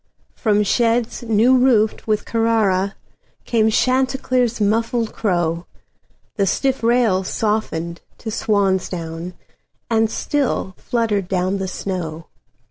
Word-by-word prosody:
From 210 -2 +1
sheds 230 +2 +1
new 230 +2 +3
roofed 240 -5 +2
with 215 -1 0
CarraraCame 220 0 0
Chanticleer's 255 -1 +1
muffled 225 +2 0
crow, 175 -4 -1 0.7
The 200 -2 +2
stiff 270 +7 0
rails 225 -6 +2
softened 170 -6 -2 0.2
to 220 - -6
swan's 200 -4 +1
down, 170 0 -6 0.6
And 225 -1 +3
still 270 -8 -1
fluttered 220 -6 -1
down 185 +1 0
the 190 - -2
snow. 170 -4 -4
215 Hz, 105 wpm, -20 LUFS, 190-230 Hz, 0.7 s, new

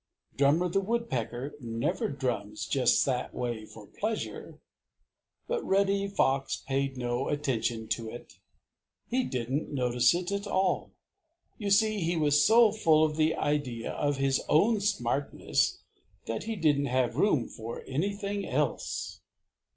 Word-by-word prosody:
Drummer 145 +6 +3
the 180 +3 +1
Woodpecker 145 - -2
never 130 - -2
drums 105 -6 -3
just 125 +2 +3
that 125 -2 -2
way 115 -3 -3
for 110 -2 -12
pleasure. 215 - -4 0.9
But 475 -1 -1
Reddy 200 0 +2
Fox 135 -8 +1
paid 135 0 -2
no 120 +1 -1
attention 120 -6 -1
to 115 -2 -2
it. 110 -5 -11 0.7
He 255 +2 +1
didn't 130 - -2
notice 125 +1 +3
it 180 +2 -3
at 200 +1 -2
all. 190 -1 0 0.7
You 205 -2 -2
see, 215 +1 +3
he 170 -1 0
was 150 -1 +4
so 225 0 +6
full 160 -7 +4
of 155 -1 -2
the 160 0 +2
idea 135 -6 -1
of 145 -1 -1
his 135 0 +1
own 210 +8 +4
smartness 140 - 0 0.4
that 115 - -4
he 225 0 -2
didn't 145 -6 +2
have 125 -2 +1
room 155 - +2
for 115 +1 -7
anything 200 +7 -2
else. - - -2
145 Hz, 135 wpm, -29 LUFS, 125-195 Hz, 0.9 s, so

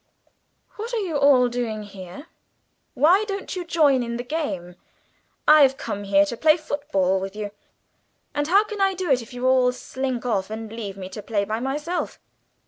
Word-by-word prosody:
"What 460 +3 -4
are 445 - 0
you 350 -6 -3
all 280 -3 +5
doing 235 -3 -3
here? 195 - -10 0.7
Why 335 +10 +5
don't 395 -2 -5
you 365 - -3
join 275 -9 +2
the 245 - -4
game? 245 - -4 0.7
I've 285 -3 +7
come 205 0 -5
here 200 0 +4
to 220 - -4
play 310 +6 +4
football 195 - 0
with 195 +1 -6
you, 210 -1 -5 0.8
and 290 0 -1
how 395 +5 +5
can 425 -2 -6
I 390 -1 +3
do 365 -4 -2
it 255 -2 +3
if 230 - -12
you 245 0 -4
all 255 -1 +4
slink 255 0 -4
off 200 -5 0
and 220 0 -6
leave 205 -4 -6
me 185 -1 -6
to 200 +3 -7
play 205 -1 -1
by 220 +2 -2
myself?" 295 +7 -3
250 Hz, 180 wpm, -23 LUFS, 210-310 Hz, 0.8 s, I've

